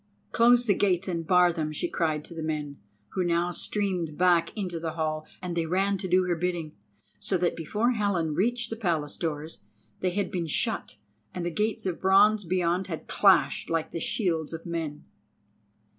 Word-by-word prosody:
"Close 240 +1 +5
the 205 - +4
gates 190 -2 +1
and 170 -3 -3
bar 180 0 +5
them," 155 -2 -2
she 155 +3 -2
cried 155 -3 -1
to - - -10
the 165 - -6
men, 150 -2 -4 0.3
who 185 - -1
now 175 0 +1
streamed 180 -5 -2
back 175 -2 +3
into 180 -5 -3
the 160 -1 -4
hall; 155 -1 -2 0.2
and 175 -1 -3
they 165 -1 0
ran 195 +4 +1
to 190 - -3
do 185 +1 +3
her 180 -1 0
bidding, 170 -2 -3 0.4
so 190 - 0
that 175 0 0
before 210 +9 0
Helen 200 -9 0
reached 230 +7 0
the - - -2
Palace 165 -9 -1
doors, 155 -1 -4 0.4
they 185 - +1
had 190 +1 -2
been 175 -3 -2
shut 220 - 0 0.4
and 175 -1 -3
the 175 - -1
gates 210 +6 -1
of 180 -3 -3
bronze 205 +3 +5
beyond 180 +1 0
had 160 -4 -6
clashed 195 -2 +3
like 165 -1 -1
the 165 - -4
shields 165 -6 -1
of 165 - -7
men. 160 -3 -4
175 Hz, 190 wpm, -27 LUFS, 160-190 Hz, 0.4 s, Close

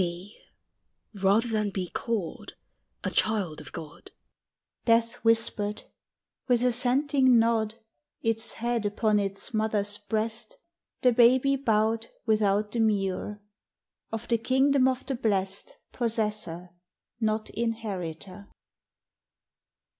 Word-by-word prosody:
"Be, 180 +3 -5 0.7
rather 200 +4 +2
than 215 -2 0
be 190 -2 -3
called, 210 -3 -4 0.5
a - - -2
child 195 -9 +1
of 145 - -12
God," 155 -2 -10 0.8
Death 230 0 +3
whispered! 225 -2 +1 0.6
with 245 -2 +2
assenting 255 +1 +3
nod, 225 -1 +2 0.5
Its 225 0 +2
head 235 -2 -1
upon 210 0 +1
its 200 +5 -2
mother's 215 -1 +1
breast, 225 - -3 0.5
The 250 - +6
baby 250 +3 +4
bowed, 225 -3 +1 0.2
without 210 -1 +2
demur 210 -2 -1 0.7
Of 225 +1 -4
the 230 -1 +2
kingdom 265 +2 +3
of 260 0 -1
the 270 - -2
Blest 195 -5 -1
Possessor, 210 -7 -2 0.5
not 215 -1 -1
inheritor. 200 -5 -4
220 Hz, 100 wpm, -27 LUFS, 205-235 Hz, 0.8 s, The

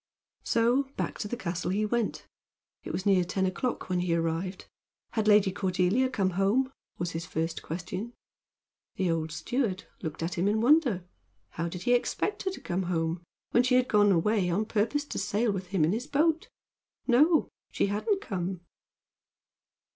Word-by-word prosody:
So 245 +4 +2
back - - -3
to 210 - -2
the 240 - -4
castle 175 -5 -3
he 205 +3 +1
went. 230 0 -1 0.6
It - - -5
was 190 - -3
near 195 -3 +4
ten 190 +2 -1
o'clock 235 +7 -2
when 180 -1 0
he 175 -1 +1
arrived. 165 +3 -2 0.5
Had 220 -2 0
Lady 205 -2 +6
Cordelia 190 +7 +1
come 195 -7 0
home? 205 +9 +2 0.3
was 175 0 -2
his 165 0 -5
first 165 +1 -2
question. 185 +7 -5 0.8
The 185 -3 +1
old 160 -1 -1
steward 195 - -1 0.2
looked 160 -1 -4
at 170 +1 -2
him 185 - +2
in 210 +2 +2
wonder. 245 - +3 0.4
How 170 +1 -3
did 180 +1 -7
he 245 - +3
expect 400 +11 0
her 380 - +1
to - - -9
come 180 +1 -2
home, 165 0 -1 0.3
when 240 - +5
she 250 0 +2
had 255 0 +4
gone 205 -1 +4
away 190 +1 +2
on 200 +5 +1
purpose 230 +7 0
to - - -4
sail 220 +2 +1
with 190 -2 -4
him 180 -4 +2
in 160 - +1
his 235 +7 -2
boat? 320 +3 +1 0.6
No. 300 +6 +4 0.2
She - - +1
hadn't 215 - 0
come. 185 - -3
195 Hz, 175 wpm, -29 LUFS, 175-240 Hz, 0.8 s, Lady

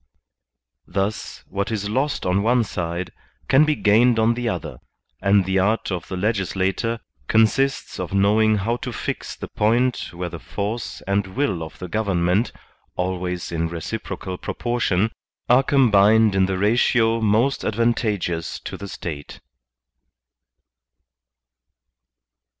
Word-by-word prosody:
Thus, 100 +3 -3
what 100 0 -2
is 105 -2 -2
lost 135 +7 -1
on 90 +2 +2
one 120 +3 +3
side 85 -3 -4 0.4
can 135 +3 +5
be 155 0 +1
gained 115 +2 +4
on 115 +1 +3
the 120 0 -2
other, 90 -7 -5 0.4
and 100 -1 +4
the 95 0 +1
art 105 +3 +1
of 90 -3 -4
the 95 - -5
legis 100 -1 -1
lator 100 +5 -1 0.3
consists 115 +5 +2
of 90 -2 -4
knowing 105 +3 +3
how 115 +4 -1
to - - -5
fix - - -4
the - - -7
point 120 +4 +1
where 90 0 -5
the 85 - -8
force 105 +7 -4
and 100 0 0
will 105 -12 0
of 80 - -8
the 90 - -6
government, 95 +1 +1 0.4
always 90 -1 -3
in 85 0 -1
reciprocal 85 +2 -5
proportion, 115 -4 0 0.4
are 125 +2 +6
combined 110 -5 +4
in 95 -1 +3
the 95 -1 -1
ratio 115 +2 +2
most 110 +6 +2
advantageous 105 -7 -1
to - - -6
the 100 - -7
State. 75 -6 -7
105 Hz, 135 wpm, -22 LUFS, 95-115 Hz, 0.4 s, are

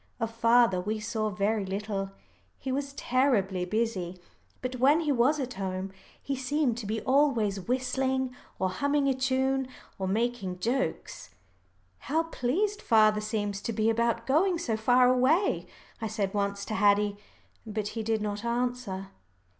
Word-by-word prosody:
Of 225 -1 -2
father 230 -4 +4
we 215 +3 -2
saw 215 0 -2
very 210 +1 0
little 195 0 -3 0.5
he 265 - -4
was 275 +1 -2
terribly 230 -10 +1
busy. 190 -3 -2 0.5
But 255 0 -3
when 285 +6 +4
he 305 -3 0
was 270 +4 +3
at 255 -2 -3
home, 190 0 -4 0.3
he 275 - -3
seemed 265 -1 0
to 215 - -6
be 220 +1 -2
always 255 -8 +2
whistling, 260 +3 -1 0.2
or 185 - 0
humming 285 +6 +1
a 270 - +3
tune, 265 0 0 0.3
or 190 - -1
making 215 -2 -1
jokes. 230 -2 -2 0.7
"How 320 +3 0
pleased 360 - -1
father 215 -2 +4
seems 205 -2 -2
to 230 - -3
be 220 +1 +2
about 230 0 0
going 340 +7 +3
so 240 -10 -1
far 245 +3 +4
away," 260 +10 +2 0.3
I 220 - -1
said 205 -3 -2
once 200 -1 -1
to - - -4
Haddie. 205 0 +3 0.5
But 210 -1 -3
he 225 - -4
did 220 -1 0
not 205 0 -3
answer. 235 -5 -2
230 Hz, 155 wpm, -28 LUFS, 205-260 Hz, 0.7 s, father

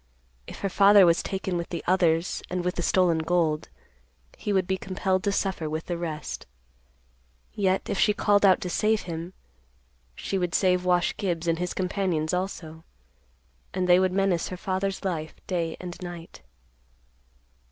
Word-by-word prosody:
If - - -9
her 200 - 0
father 200 0 +7
was 170 0 +4
taken 190 -2 -3
with 170 - -4
the 170 - -4
others 170 -2 +2
and 180 0 -2
with 180 - 0
the 175 - -3
stolen 175 -2 +3
gold, 160 -2 0 0.7
he 210 - -4
would 190 -2 +2
be 190 - 0
compelled 190 0 -1
to 200 - +2
suffer 190 -6 -1
with 155 +1 -4
the 175 - -3
rest. 160 -3 -5 1.1
Yet 190 -2 0
if 195 - -2
she 210 - +4
called 205 -1 +2
out 190 0 +5
to 180 - -3
save 215 +3 +2
him, 170 +1 -6 0.8
she 195 - -2
would 180 -1 -1
save 180 -1 +2
Wash 180 -1 +2
Gibbs 175 -5 -2
and 165 0 +1
his 180 0 -3
companions 180 -4 -1
also, 165 -3 -4 0.9
and 185 -1 0
they 180 0 +6
would 185 -1 +2
menace 190 -3 +1
her 185 - -6
father's 195 +1 -2
life 160 -4 -3
day 170 -3 -2
and 175 -1 -7
night. 175 -2 -9
180 Hz, 165 wpm, -26 LUFS, 170-190 Hz, 1.1 s, father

